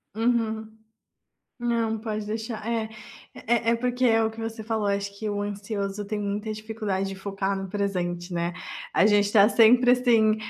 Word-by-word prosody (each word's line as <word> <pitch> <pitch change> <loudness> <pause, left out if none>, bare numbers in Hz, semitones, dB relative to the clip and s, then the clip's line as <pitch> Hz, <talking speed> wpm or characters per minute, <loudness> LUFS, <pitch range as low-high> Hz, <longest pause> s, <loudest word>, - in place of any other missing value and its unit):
Uhum. 220 -1 0 0.8
Não, 230 -2 0
pode 215 -1 -4
deixar, 220 0 -4
eh 225 -2 -1 0.5
eh, 230 0 +1
é 235 - +4
porque 250 +1 -1
é 225 -2 +4
o 220 - +1
que 225 - -14
você 225 0 -5
falou. 220 -1 -1
Acho 200 0 -2
que 215 - -3
o 205 0 -2
ansioso 205 0 -4
tem 210 +1 -3
muita 205 +2 -2
dificuldade 215 -3 -3
de 195 - -5
focar 195 0 -2
no 195 0 -5
presente, 180 -3 -2
né? 170 0 -1 0.4
A 315 - +4
gente 205 -1 +3
tá 210 -1 +7
sempre 245 +2 +6
assim, 230 -4 +4
215 Hz, 170 wpm, -26 LUFS, 200-225 Hz, 0.8 s, tá